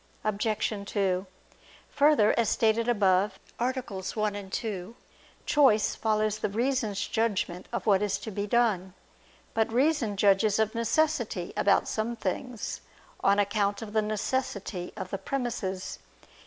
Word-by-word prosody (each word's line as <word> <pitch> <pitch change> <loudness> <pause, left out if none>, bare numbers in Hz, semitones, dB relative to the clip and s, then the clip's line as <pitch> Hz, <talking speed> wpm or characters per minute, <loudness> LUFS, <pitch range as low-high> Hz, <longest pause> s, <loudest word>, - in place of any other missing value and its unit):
Obj. 215 +1 0
2: 190 -2 0 0.6
Further, 285 -7 +4
as 230 -2 +2
stated 225 +1 +2
above 195 -3 +2 0.2
(A. 245 +2 +2
1, 210 -4 -3
ad 195 -2 -7
2), 210 0 -4 0.5
choice 260 -8 +4
follows 215 -1 0
the - - -1
reason's 225 -2 -1
judgment 200 -6 -1
of 235 - -3
what 200 -3 +4
is 200 -2 0
to 220 - -7
be 205 +1 -3
done. 200 -5 +1 0.6
But 225 0 +1
reason 250 -5 +1
judges 200 +1 +4
of 220 0 +1
necessity 230 - 0
about 200 - +3
some 225 +2 -2
things: 230 +3 -4 0.4
on 200 +1 +3
account 205 +1 +1
of 210 -1 -8
the 220 - +3
necessity 215 -3 -2
of 185 -1 -6
the 195 - -3
premises. 230 -8 -3
215 Hz, 135 wpm, -28 LUFS, 200-230 Hz, 0.6 s, Further